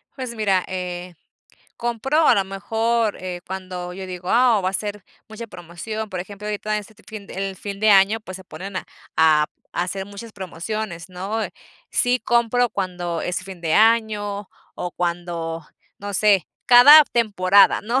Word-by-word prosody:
Pues, 255 Hz, -3 st, -6 dB
mira, 195 Hz, -4 st, +1 dB
eh, 180 Hz, -1 st, -5 dB, 0.6 s
compro 240 Hz, +7 st, +1 dB
a -, -, +6 dB
lo 195 Hz, -, +1 dB
mejor, 220 Hz, +3 st, -1 dB
eh, 180 Hz, -1 st, -5 dB
cuando 185 Hz, -1 st, -6 dB
yo 190 Hz, +1 st, -7 dB
digo: 180 Hz, 0 st, -6 dB
"Ah, 235 Hz, -3 st, +4 dB
va 185 Hz, -, 0 dB
a -, -, -11 dB
ser 205 Hz, 0 st, -4 dB, 0.2 s
mucha 225 Hz, +2 st, -8 dB
promoción", 205 Hz, +5 st, -7 dB
por 185 Hz, -2 st, -4 dB
ejemplo, 205 Hz, +2 st, -8 dB
ahorita 210 Hz, 0 st, -3 dB
en 210 Hz, -, 0 dB
este 215 Hz, +1 st, -15 dB
fin 210 Hz, -2 st, -9 dB
el 195 Hz, 0 st, -4 dB
fin 200 Hz, +1 st, -7 dB
de 215 Hz, 0 st, +4 dB
año, 200 Hz, +3 st, +5 dB
pues, 185 Hz, -3 st, -8 dB
se 190 Hz, -, -13 dB
ponen 190 Hz, +1 st, -8 dB
a -, -, -3 dB, 0.3 s
a 155 Hz, -1 st, +5 dB, 0.3 s
a 175 Hz, -, 0 dB
hacer 190 Hz, +1 st, -4 dB
muchas 205 Hz, +3 st, -10 dB
promociones, 190 Hz, 0 st, -5 dB
¿no? 195 Hz, +5 st, -4 dB, 0.5 s
Sí 250 Hz, 0 st, +2 dB
compro 240 Hz, +1 st, +2 dB
cuando 175 Hz, -3 st, -3 dB
es 180 Hz, 0 st, -3 dB
fin 190 Hz, -3 st, -10 dB
de 160 Hz, -2 st, 0 dB
año, 210 Hz, -3 st, +2 dB, 0.3 s
o 175 Hz, -, -4 dB
cuando 170 Hz, -2 st, -3 dB, 0.3 s
no 205 Hz, 0 st, -6 dB
sé, 200 Hz, -4 st, +3 dB, 0.2 s
cada 285 Hz, +5 st, +10 dB
temporada, 200 Hz, -4 st, +4 dB
¿no? 240 Hz, +5 st, 0 dB
200 Hz, 170 wpm, -22 LUFS, 180-220 Hz, 0.6 s, cada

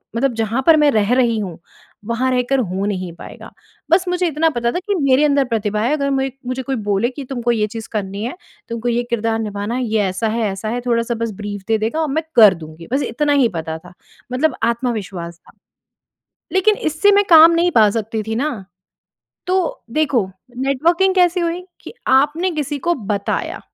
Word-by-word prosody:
मतलब 255 Hz, +1 st, +1 dB
जहाँ 225 Hz, +3 st, -1 dB
पर 320 Hz, -1 st, +7 dB
मैं 295 Hz, -1 st, +4 dB
रह 215 Hz, 0 st, +2 dB
रही 240 Hz, -3 st, +2 dB
हूँ 180 Hz, -5 st, -5 dB, 0.5 s
वहाँ 240 Hz, +3 st, 0 dB
रहकर 255 Hz, +2 st, +1 dB
हो 190 Hz, -3 st, -2 dB
नहीं 185 Hz, -3 st, -3 dB
पाएगा। -, -, -11 dB, 0.4 s
बस 360 Hz, +2 st, +4 dB
मुझे 360 Hz, 0 st, +1 dB
इतना 320 Hz, +1 st, +1 dB
पता 235 Hz, -2 st, -1 dB
था 355 Hz, -, -2 dB
कि 400 Hz, +1 st, -2 dB
मेरे 275 Hz, +1 st, +4 dB
अंदर 280 Hz, -2 st, +3 dB
प्रतिभा 215 Hz, -3 st, -1 dB
है 250 Hz, +7 st, +1 dB
अगर 280 Hz, -2 st, 0 dB
मैं 270 Hz, 0 st, 0 dB, 0.2 s
मुझे 255 Hz, +1 st, -2 dB
कोई 270 Hz, +1 st, -2 dB
बोले 205 Hz, +4 st, +1 dB
कि 275 Hz, +2 st, -8 dB
तुमको 240 Hz, -2 st, -1 dB
ये 215 Hz, -2 st, +1 dB
चीज़ 225 Hz, +1 st, -7 dB
करनी 200 Hz, 0 st, -3 dB
है, 245 Hz, -, -4 dB, 0.3 s
तुमको 235 Hz, +1 st, -2 dB
ये 240 Hz, +1 st, 0 dB
किरदार 225 Hz, -1 st, 0 dB
निभाना 210 Hz, +1 st, -3 dB
है, 255 Hz, -, -1 dB
ये 220 Hz, -1 st, 0 dB
ऐसा 190 Hz, +4 st, -1 dB
है, 225 Hz, +1 st, -1 dB
ऐसा 195 Hz, +3 st, -5 dB
है 245 Hz, +2 st, -2 dB
थोड़ा-सा 235 Hz, -1 st, 0 dB
बस 230 Hz, -1 st, -3 dB
ब्रीफ 205 Hz, -1 st, -5 dB
दे 220 Hz, -, +3 dB
देगा 225 Hz, +9 st, -2 dB
और 315 Hz, -, 0 dB
मैं 320 Hz, +2 st, 0 dB
कर 215 Hz, -5 st, +8 dB
दूँगी, 160 Hz, +1 st, -11 dB
बस 280 Hz, -, +2 dB
इतना 295 Hz, -1 st, 0 dB
ही 260 Hz, -5 st, +3 dB
पता 160 Hz, 0 st, -4 dB
था, 180 Hz, +2 st, -15 dB, 0.4 s
मतलब 265 Hz, +1 st, +1 dB
आत्मविश्वास 210 Hz, -8 st, -2 dB
था। -, -, -21 dB, 1.0 s
लेकिन 410 Hz, +3 st, +3 dB
इससे 315 Hz, +7 st, +2 dB
मैं 405 Hz, 0 st, +4 dB
काम 325 Hz, +1 st, +9 dB
नहीं 345 Hz, +1 st, +2 dB
पा 220 Hz, -2 st, +5 dB
सकती 220 Hz, 0 st, -3 dB
थी 225 Hz, -, -2 dB
ना। 295 Hz, +2 st, -1 dB, 0.9 s
तो 365 Hz, -2 st, -1 dB
देखो, 260 Hz, -9 st, +1 dB, 0.3 s
नेटवर्किंग 330 Hz, +9 st, +2 dB
कैसी 360 Hz, -1 st, +3 dB
हुई 340 Hz, +1 st, -2 dB, 0.2 s
कि -, -, -10 dB, 0.2 s
आपने 295 Hz, +7 st, +3 dB
किसी 295 Hz, -2 st, -3 dB
को 345 Hz, -, +4 dB
बताया 205 Hz, -6 st, -3 dB
240 Hz, 200 wpm, -19 LUFS, 215-295 Hz, 1.0 s, काम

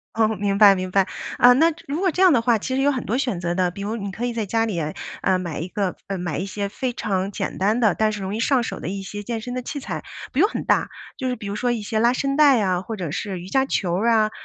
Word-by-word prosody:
哦， 225 Hz, -1 st, +4 dB
明 200 Hz, 0 st, -1 dB
白 205 Hz, -1 st, +8 dB
明 185 Hz, -1 st, -3 dB
白。 190 Hz, 0 st, +2 dB, 0.3 s
啊， 245 Hz, 0 st, +7 dB
那 320 Hz, +6 st, +4 dB, 0.2 s
如 285 Hz, +4 st, -2 dB
果 380 Hz, 0 st, +2 dB
这 360 Hz, -, -2 dB
样 370 Hz, -4 st, +7 dB
的 240 Hz, -, +3 dB
话， 235 Hz, -1 st, +3 dB
其 260 Hz, +5 st, -3 dB
实 265 Hz, -, +1 dB
有 285 Hz, +1 st, +3 dB
很 260 Hz, -3 st, -3 dB
多 230 Hz, -, 0 dB
选 245 Hz, -9 st, -1 dB
择 175 Hz, 0 st, -1 dB
的， 180 Hz, 0 st, +1 dB
比 200 Hz, -, -8 dB
如 215 Hz, +3 st, -2 dB
你 200 Hz, -3 st, -4 dB
可 225 Hz, +5 st, -4 dB
以 245 Hz, -, -2 dB
在 225 Hz, -2 st, -2 dB
家 225 Hz, +3 st, +1 dB
里 205 Hz, -6 st, -2 dB
哎， 155 Hz, -1 st, -3 dB, 0.3 s
呃， 190 Hz, -1 st, +2 dB
买 175 Hz, -4 st, -4 dB
一 165 Hz, -, -4 dB
个 190 Hz, -1 st, -2 dB, 0.2 s
买 175 Hz, -4 st, -3 dB
一 185 Hz, -, -2 dB
些 200 Hz, 0 st, -3 dB
非 250 Hz, +5 st, -3 dB
常 195 Hz, -3 st, -2 dB
简 -, -, -4 dB
单 210 Hz, +5 st, +2 dB
的， 220 Hz, -6 st, +4 dB
但 215 Hz, 0 st, +1 dB
是 210 Hz, -2 st, -5 dB
容 195 Hz, +2 st, -3 dB
易 -, -, -3 dB
上 255 Hz, +1 st, +2 dB
手 -, -, -5 dB
的 -, -, -6 dB
一 195 Hz, +2 st, -4 dB
些 205 Hz, +2 st, -6 dB
健 230 Hz, +2 st, -3 dB
身 245 Hz, +3 st, -6 dB
的 255 Hz, -, -2 dB
器 285 Hz, +4 st, -5 dB
材。 275 Hz, -, -5 dB, 0.3 s
不 265 Hz, -, -1 dB
用 405 Hz, +5 st, +5 dB
很 -, -, -4 dB
大， -, -, +2 dB, 0.3 s
就 260 Hz, -, -3 dB
是 250 Hz, -, -1 dB
比 220 Hz, -, -10 dB
如 200 Hz, -, -3 dB
说， 245 Hz, +3 st, 0 dB
一 235 Hz, -2 st, -2 dB
些 220 Hz, +1 st, -1 dB
拉 235 Hz, +2 st, +4 dB
伸 275 Hz, +1 st, -1 dB
带 290 Hz, -3 st, +6 dB
呀， 185 Hz, -4 st, +1 dB
或 220 Hz, +3 st, -5 dB
者 175 Hz, -7 st, -4 dB
是 190 Hz, +3 st, -4 dB
瑜 175 Hz, -, -9 dB
伽 265 Hz, +3 st, +2 dB
球 180 Hz, -8 st, 0 dB
啊， 220 Hz, -2 st, +3 dB
215 Hz, 325 characters per minute, -23 LUFS, 190-245 Hz, 0.3 s, 白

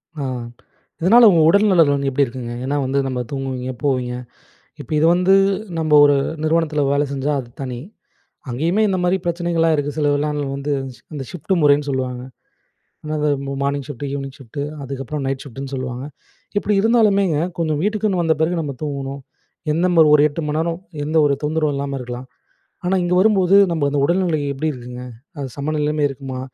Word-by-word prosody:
ஆ. 145 Hz, -, -4 dB, 0.8 s
இதனால 230 Hz, +8 st, +7 dB
உங்க 170 Hz, -3 st, +4 dB
உடல் 200 Hz, +4 st, +4 dB
நலன் 165 Hz, -6 st, +5 dB
வந்து 140 Hz, -1 st, -1 dB
எப்படி 140 Hz, +2 st, +2 dB
இருக்குங்க? 120 Hz, -1 st, -6 dB
ஏன்னா 140 Hz, +2 st, -1 dB
வந்து, 135 Hz, +2 st, 0 dB
நம்ம 130 Hz, -1 st, -3 dB
தூங்குவீங்க, 130 Hz, -2 st, -3 dB
போவீங்க. 130 Hz, -3 st, 0 dB, 0.7 s
இப்ப -, -, -10 dB
இது 155 Hz, -, +4 dB
வந்து 180 Hz, +2 st, +4 dB, 0.4 s
நம்ப 155 Hz, -1 st, -1 dB
ஒரு 145 Hz, -1 st, +5 dB, 0.3 s
நிறுவனத்தில 155 Hz, -1 st, +1 dB
வேலை 140 Hz, +1 st, +2 dB
செஞ்சா 140 Hz, +2 st, -1 dB
அது 120 Hz, -, -11 dB
தனி. 125 Hz, -3 st, -4 dB, 0.7 s
அங்கேயுமே 165 Hz, -, +1 dB
இந்த 190 Hz, -2 st, 0 dB
மாரி 180 Hz, +1 st, +2 dB
பிரச்சனைகள்லாம் 170 Hz, -1 st, +1 dB
இருக்கு. 145 Hz, 0 st, -1 dB
சிலதுலாம் 150 Hz, 0 st, +1 dB
அதுல 145 Hz, -1 st, -2 dB
வந்து 140 Hz, +1 st, -3 dB, 0.2 s
சி 115 Hz, -, -19 dB
இந்த 140 Hz, -2 st, -4 dB
ஷிஃப்ட் 180 Hz, +2 st, -4 dB
முறைன்னு 145 Hz, 0 st, +4 dB
சொல்லுவாங்க. 130 Hz, -2 st, -3 dB, 0.8 s
ஆனா 155 Hz, 0 st, -4 dB
அது 150 Hz, 0 st, +2 dB, 0.2 s
மா 140 Hz, -, -3 dB
மார்னிங் 140 Hz, 0 st, -1 dB
ஷிஃப்ட்டு, 145 Hz, -1 st, -6 dB
ஈவினிங் 135 Hz, -1 st, -5 dB
ஷிஃப்ட், 135 Hz, +1 st, -8 dB, 0.2 s
அதுக்கப்புறம் 135 Hz, +2 st, -5 dB
நைட் 135 Hz, -1 st, -2 dB
ஷிஃப்ட்ன்னு 135 Hz, +1 st, -8 dB
சொல்லுவாங்க. 130 Hz, -1 st, -4 dB, 0.5 s
இப்படி 205 Hz, +1 st, +1 dB
இருந்தாலுமேங்க 200 Hz, -7 st, +3 dB, 0.2 s
கொஞ்சம் 155 Hz, -3 st, 0 dB
வீட்டுக்குன்னு 210 Hz, -3 st, 0 dB
வந்த 160 Hz, -1 st, +2 dB
பிறகு 165 Hz, +3 st, +1 dB
நம்ம 145 Hz, -3 st, -3 dB
தூங்கணும். 140 Hz, -2 st, -4 dB, 0.5 s
என்ன 165 Hz, +3 st, 0 dB
நம்ப 175 Hz, -2 st, +4 dB
ஒரு 145 Hz, -, +6 dB
8 150 Hz, +3 st, -5 dB
மணிநேரம் 165 Hz, +3 st, -1 dB, 0.3 s
எந்த 155 Hz, +2 st, -2 dB
ஒரு 140 Hz, -, +2 dB
தொந்தரவும் 155 Hz, -1 st, 0 dB
இல்லாம 140 Hz, 0 st, -3 dB
இருக்கலாம். 125 Hz, +1 st, -7 dB, 0.6 s
ஆனா, 185 Hz, +2 st, +2 dB
இங்க 175 Hz, 0 st, 0 dB
வரும்போது 195 Hz, -2 st, +4 dB, 0.2 s
நம்ம 160 Hz, -4 st, 0 dB
அந்த 145 Hz, 0 st, 0 dB
உடல்நிலை 175 Hz, -1 st, +1 dB
எப்படி 140 Hz, +3 st, -2 dB
இருக்குங்க, 125 Hz, -1 st, -9 dB, 0.4 s
அது 140 Hz, -2 st, -4 dB
சமநிலைமை 150 Hz, +1 st, -1 dB
இருக்குமா? 135 Hz, -1 st, -6 dB
145 Hz, 170 wpm, -20 LUFS, 135-165 Hz, 0.8 s, இதனால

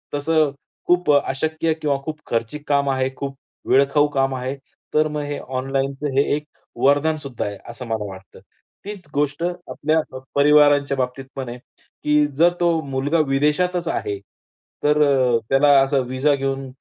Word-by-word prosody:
तसं 155 Hz, 0 st, +2 dB, 0.4 s
खूप 180 Hz, -3 st, +3 dB
अशक्य 155 Hz, +3 st, 0 dB
किंवा 145 Hz, -2 st, +1 dB
खूप 155 Hz, -1 st, -5 dB
खर्चिक 115 Hz, +6 st, -3 dB
काम 140 Hz, -1 st, +2 dB
आहे, 130 Hz, 0 st, 0 dB
खूप 135 Hz, -1 st, -5 dB, 0.3 s
वेळखाऊ 140 Hz, +2 st, +4 dB
काम 135 Hz, 0 st, +2 dB
आहे 130 Hz, +2 st, -3 dB, 0.4 s
तर 155 Hz, 0 st, +3 dB
मग 150 Hz, -1 st, -3 dB
हे 145 Hz, 0 st, -4 dB
ऑनलाईनचं 135 Hz, +2 st, -2 dB
हे 140 Hz, -, +5 dB
एक 150 Hz, -, -4 dB, 0.4 s
वरदान 145 Hz, +3 st, +3 dB
सुद्धा 140 Hz, -5 st, -5 dB
आहे 100 Hz, -1 st, -5 dB
असं 120 Hz, +2 st, -8 dB
मला 110 Hz, -2 st, -2 dB
वाटतं. 95 Hz, 0 st, -12 dB, 0.5 s
तीच 200 Hz, -5 st, -8 dB
गोष्ट 145 Hz, +2 st, -1 dB
आपल्या 175 Hz, -3 st, -1 dB, 0.4 s
परिवारांच्या 145 Hz, -1 st, +4 dB
बाबतीत 130 Hz, +1 st, -3 dB
पण 130 Hz, -3 st, -5 dB
आहे, 120 Hz, -, -7 dB, 0.5 s
की 150 Hz, 0 st, +3 dB
जर 170 Hz, +2 st, +5 dB
तो 170 Hz, -2 st, +2 dB
मुलगा 140 Hz, +4 st, 0 dB
विदेशातच 160 Hz, +5 st, +1 dB
आहे 100 Hz, -10 st, -2 dB, 0.6 s
तर 150 Hz, +1 st, +3 dB
अ, 130 Hz, -4 st, +3 dB
त्याला 135 Hz, +2 st, +4 dB
असा 135 Hz, +1 st, +1 dB
विजा 135 Hz, +3 st, +2 dB
घेऊन 135 Hz, 0 st, -3 dB
140 Hz, 155 wpm, -21 LUFS, 135-150 Hz, 0.6 s, हे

